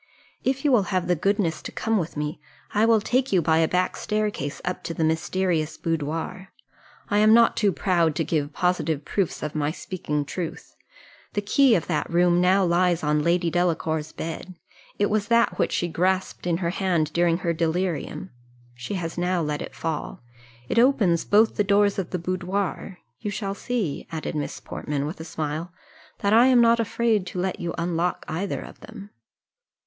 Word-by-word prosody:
If 270 Hz, +2 st, -1 dB
you 290 Hz, -, +4 dB
will 240 Hz, -5 st, +5 dB
have 185 Hz, -2 st, 0 dB
the 180 Hz, -, +3 dB
goodness 190 Hz, -1 st, 0 dB
to -, -, -7 dB
come 225 Hz, -1 st, 0 dB
with 165 Hz, -3 st, -4 dB
me, 150 Hz, 0 st, -3 dB, 0.3 s
I 215 Hz, +2 st, +3 dB
will 225 Hz, -2 st, +4 dB
take 255 Hz, +5 st, 0 dB
you 190 Hz, -, +4 dB
by 160 Hz, -1 st, +2 dB
a 160 Hz, -, +3 dB
back 180 Hz, +2 st, 0 dB
staircase 210 Hz, -9 st, -2 dB
up 180 Hz, 0 st, -3 dB
to 165 Hz, -, -4 dB
the 160 Hz, -, 0 dB
mysterious 160 Hz, 0 st, 0 dB
boudoir. 165 Hz, +3 st, -3 dB, 0.6 s
I 205 Hz, -, +2 dB
am 215 Hz, +1 st, +6 dB
not 235 Hz, 0 st, +5 dB
too 205 Hz, -3 st, +2 dB
proud 170 Hz, -6 st, +1 dB
to 165 Hz, -, 0 dB
give 150 Hz, -2 st, -1 dB
positive 165 Hz, -4 st, 0 dB
proofs 195 Hz, -4 st, -1 dB
of 150 Hz, -, -3 dB
my 150 Hz, -1 st, 0 dB
speaking 150 Hz, -3 st, -3 dB
truth; 170 Hz, +3 st, -6 dB, 0.6 s
the 205 Hz, -, 0 dB
key 260 Hz, +3 st, +4 dB
of 170 Hz, -, 0 dB
that 155 Hz, -4 st, -1 dB
room 175 Hz, +1 st, +3 dB
now 190 Hz, +2 st, +4 dB
lies 175 Hz, -1 st, +2 dB
on 150 Hz, 0 st, +2 dB
Lady 170 Hz, +1 st, +1 dB
Delacour's 160 Hz, -3 st, 0 dB
bed 165 Hz, +3 st, -6 dB, 0.4 s
it 205 Hz, -, +2 dB
was 205 Hz, -1 st, 0 dB
that 235 Hz, +1 st, +2 dB
which -, -, +1 dB
she 175 Hz, -, 0 dB
grasped 185 Hz, +3 st, -1 dB
in 170 Hz, -1 st, +1 dB
her 170 Hz, -, +1 dB
hand 175 Hz, -5 st, 0 dB
during 170 Hz, -1 st, +2 dB
her 170 Hz, -2 st, -1 dB
delirium 175 Hz, +2 st, -2 dB, 0.4 s
she 125 Hz, +11 st, -6 dB
has 170 Hz, -2 st, -4 dB
now 180 Hz, 0 st, +1 dB
let 150 Hz, -1 st, -2 dB
it -, -, -7 dB
fall 155 Hz, -6 st, -4 dB, 0.4 s
it 230 Hz, -, +1 dB
opens 215 Hz, -10 st, +3 dB
both 215 Hz, +2 st, +4 dB
the 205 Hz, -, +3 dB
doors 200 Hz, 0 st, +3 dB
of 180 Hz, -, -3 dB
the 180 Hz, -, -2 dB
boudoir 185 Hz, +2 st, -3 dB, 0.2 s
you 210 Hz, -, -4 dB
shall 200 Hz, -1 st, -3 dB
see," 205 Hz, -8 st, -3 dB
added 160 Hz, -1 st, -4 dB
Miss 150 Hz, -2 st, -4 dB
Portman, 145 Hz, -1 st, -4 dB
with 155 Hz, +4 st, -6 dB
a -, -, -5 dB
smile, 160 Hz, +1 st, -4 dB, 0.5 s
"that 200 Hz, +1 st, +2 dB
I 235 Hz, +3 st, +7 dB
am 255 Hz, -2 st, +5 dB
not 235 Hz, 0 st, +5 dB
afraid 225 Hz, -3 st, +1 dB
to 180 Hz, -, -5 dB
let 185 Hz, +1 st, -2 dB
you 170 Hz, -1 st, -3 dB
unlock 170 Hz, +1 st, -1 dB
either 180 Hz, +5 st, -3 dB
of -, -, -11 dB
them." 210 Hz, -2 st, -11 dB
180 Hz, 190 wpm, -24 LUFS, 160-205 Hz, 0.6 s, I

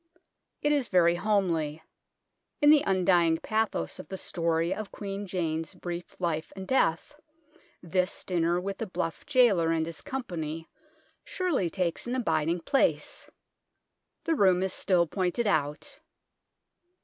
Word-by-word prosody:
It 295 Hz, -, +3 dB
is 285 Hz, -5 st, +2 dB
very 170 Hz, -2 st, +4 dB
homely. 175 Hz, -6 st, 0 dB, 0.8 s
In 295 Hz, -2 st, +6 dB
the 305 Hz, -2 st, +6 dB
undying 175 Hz, -3 st, +3 dB
pathos 215 Hz, -, -1 dB
of -, -, -8 dB
the 190 Hz, -, -6 dB
story 165 Hz, -1 st, 0 dB
of 215 Hz, -2 st, -6 dB
Queen 200 Hz, 0 st, -5 dB
Jane's 165 Hz, -1 st, -3 dB
brief 175 Hz, -1 st, -7 dB
life 165 Hz, -3 st, -2 dB
and 190 Hz, -1 st, -7 dB
death, 225 Hz, -, +1 dB, 0.7 s
this 180 Hz, +2 st, -1 dB
dinner 175 Hz, -1 st, +1 dB
with 195 Hz, +2 st, -5 dB
the 225 Hz, -, -3 dB
bluff 165 Hz, -, -4 dB
gaoler 235 Hz, -, +4 dB
and 165 Hz, -1 st, +1 dB
his 165 Hz, -1 st, -6 dB
company 165 Hz, -, -5 dB, 0.6 s
surely 330 Hz, -, -1 dB
takes 180 Hz, +3 st, -2 dB
an 245 Hz, -, -1 dB
abiding 165 Hz, -7 st, 0 dB
place. 270 Hz, +11 st, 0 dB, 0.9 s
The 330 Hz, -, +1 dB
room 190 Hz, -, +4 dB
is 190 Hz, -, -1 dB
still 180 Hz, -3 st, +2 dB
pointed 185 Hz, +6 st, -1 dB
out. 150 Hz, -7 st, -1 dB
180 Hz, 135 wpm, -28 LUFS, 165-205 Hz, 0.9 s, In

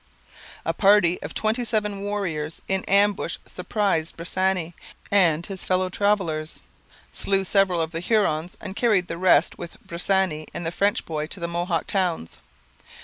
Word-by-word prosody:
A -, -, 0 dB
party 195 Hz, -3 st, +4 dB
of -, -, -7 dB
twenty 220 Hz, +3 st, 0 dB
seven 210 Hz, -3 st, -1 dB
warriors 180 Hz, -7 st, -3 dB
in 190 Hz, -1 st, 0 dB
ambush 200 Hz, 0 st, +2 dB
surprised 195 Hz, -7 st, -1 dB
Bressani 180 Hz, 0 st, -1 dB, 0.4 s
and 175 Hz, -5 st, +3 dB
his 195 Hz, -3 st, -7 dB
fellow 185 Hz, 0 st, +1 dB
travellers, 185 Hz, -6 st, -1 dB, 0.5 s
slew 195 Hz, -1 st, +2 dB
several 190 Hz, -2 st, +2 dB
of 160 Hz, -, -5 dB
the 165 Hz, -, -3 dB
Hurons, 175 Hz, -4 st, 0 dB
and 195 Hz, -2 st, -7 dB
carried 205 Hz, -7 st, +2 dB
the 165 Hz, -, -5 dB
rest 180 Hz, -3 st, +3 dB
with 170 Hz, -, -8 dB
Bressani 175 Hz, -2 st, 0 dB
and 170 Hz, -, -4 dB
the 165 Hz, -, -1 dB
French 200 Hz, +3 st, +1 dB
boy 155 Hz, -2 st, -3 dB
to 185 Hz, -, -7 dB
the 170 Hz, -, -2 dB
Mohawk 170 Hz, 0 st, -1 dB
towns. 180 Hz, -, -1 dB
185 Hz, 150 wpm, -24 LUFS, 170-200 Hz, 0.5 s, party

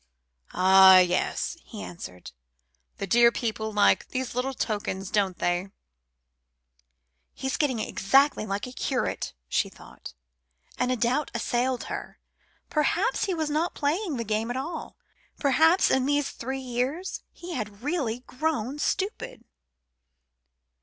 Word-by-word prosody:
"Ah! 190 Hz, +1 st, +8 dB
yes," 180 Hz, -, +1 dB
he 215 Hz, -3 st, -9 dB
answered, 90 Hz, -, -9 dB, 0.7 s
"the -, -, -3 dB
dear 235 Hz, +4 st, +5 dB
people 220 Hz, -2 st, -3 dB
like 205 Hz, -1 st, +3 dB
these 255 Hz, -1 st, -3 dB
little 255 Hz, +2 st, -2 dB
tokens, 200 Hz, -4 st, -3 dB
don't 195 Hz, -3 st, +1 dB
they?" 175 Hz, +2 st, 0 dB, 1.7 s
"He's 265 Hz, 0 st, -2 dB
getting 280 Hz, -6 st, +1 dB
exactly 270 Hz, +3 st, +2 dB
like 200 Hz, 0 st, -2 dB
a 250 Hz, -, -8 dB
curate," 255 Hz, 0 st, -2 dB
she -, -, 0 dB
thought, -, -, -13 dB, 0.6 s
and 250 Hz, +1 st, +1 dB
a -, -, +2 dB
doubt 250 Hz, +5 st, 0 dB
assailed 245 Hz, +1 st, 0 dB
her. -, -, -7 dB, 0.5 s
Perhaps 335 Hz, -, +1 dB
he 380 Hz, -3 st, -1 dB
was 315 Hz, -2 st, -2 dB
not 320 Hz, +4 st, 0 dB
playing 310 Hz, +1 st, -1 dB
the 230 Hz, -, -2 dB
game 220 Hz, +1 st, -1 dB
at 245 Hz, -, -2 dB
all. 320 Hz, +5 st, -5 dB, 0.4 s
Perhaps 320 Hz, +6 st, +4 dB
in 265 Hz, 0 st, +2 dB
these 290 Hz, -1 st, +1 dB
three 265 Hz, +3 st, -5 dB
years 260 Hz, +8 st, -3 dB
he 350 Hz, 0 st, -8 dB
had 210 Hz, -5 st, -5 dB
really 270 Hz, -7 st, -1 dB
grown 270 Hz, -1 st, -2 dB
stupid. 440 Hz, +9 st, -2 dB
250 Hz, 130 wpm, -26 LUFS, 215-295 Hz, 1.7 s, Ah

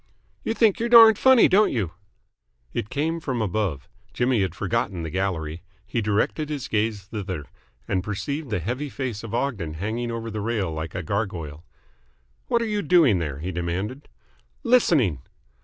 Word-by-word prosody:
"You 225 Hz, -, -1 dB
think 220 Hz, -5 st, +3 dB
you're 235 Hz, +1 st, -1 dB
darned 225 Hz, -3 st, +9 dB
funny, 260 Hz, -3 st, +7 dB
don't 210 Hz, +3 st, +4 dB
you?" 100 Hz, -9 st, -1 dB, 0.8 s
It 105 Hz, -, -3 dB
came 160 Hz, +3 st, -1 dB
from 130 Hz, -6 st, -3 dB
above. 95 Hz, -, -2 dB, 0.3 s
Jimmy 120 Hz, -3 st, +2 dB
had 95 Hz, -3 st, -1 dB
forgotten 100 Hz, -4 st, -2 dB
the 80 Hz, -, -5 dB
gallery. 85 Hz, -4 st, -2 dB, 0.2 s
He 115 Hz, +3 st, -2 dB
directed 105 Hz, +9 st, 0 dB
his 145 Hz, -4 st, -4 dB
gaze 105 Hz, -2 st, -1 dB
thither, 95 Hz, -7 st, -5 dB, 0.4 s
and 95 Hz, -2 st, 0 dB
perceived 140 Hz, +8 st, -4 dB
the 105 Hz, -, 0 dB
heavy 125 Hz, -, -3 dB
face 125 Hz, -7 st, -4 dB
of 115 Hz, 0 st, -5 dB
Ogden 105 Hz, -, -2 dB
hanging 110 Hz, +7 st, -3 dB
over 115 Hz, -1 st, -4 dB
the 105 Hz, 0 st, -4 dB
rail 105 Hz, -5 st, -1 dB
like 80 Hz, +1 st, -5 dB
a 90 Hz, -, -3 dB
gargoyle. 85 Hz, -6 st, -3 dB, 0.8 s
"What 235 Hz, -2 st, +2 dB
are -, -, -1 dB
you 210 Hz, -2 st, -1 dB
doing 160 Hz, -, +4 dB
there?" 75 Hz, -5 st, -3 dB
he 90 Hz, +3 st, -3 dB
demanded. 95 Hz, -, -4 dB, 0.5 s
"Listening." 155 Hz, -, +3 dB
110 Hz, 165 wpm, -24 LUFS, 90-140 Hz, 0.8 s, darned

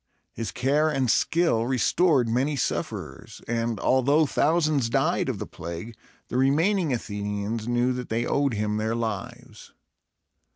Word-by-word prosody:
His 115 Hz, -2 st, -4 dB
care 145 Hz, +5 st, +1 dB
and 130 Hz, -6 st, +1 dB
skill 165 Hz, -9 st, +2 dB
restored 135 Hz, +1 st, +2 dB
many 130 Hz, +6 st, 0 dB
sufferers; 135 Hz, -, -4 dB
and, 115 Hz, -2 st, -1 dB
although 140 Hz, +7 st, +3 dB
thousands 150 Hz, -4 st, +1 dB
died -, -, +1 dB
of -, -, -2 dB
the -, -, -5 dB
plague, 85 Hz, +7 st, -7 dB, 0.3 s
the 125 Hz, -, -3 dB
remaining 160 Hz, +6 st, +2 dB
Athenians 105 Hz, -1 st, -3 dB
knew 120 Hz, +1 st, +1 dB
that 125 Hz, -1 st, -6 dB
they 115 Hz, +2 st, -1 dB
owed 140 Hz, -3 st, +1 dB
him 105 Hz, 0 st, -1 dB
their 110 Hz, +1 st, -1 dB
lives. 115 Hz, +1 st, -6 dB
120 Hz, 135 wpm, -25 LUFS, 110-140 Hz, 0.3 s, although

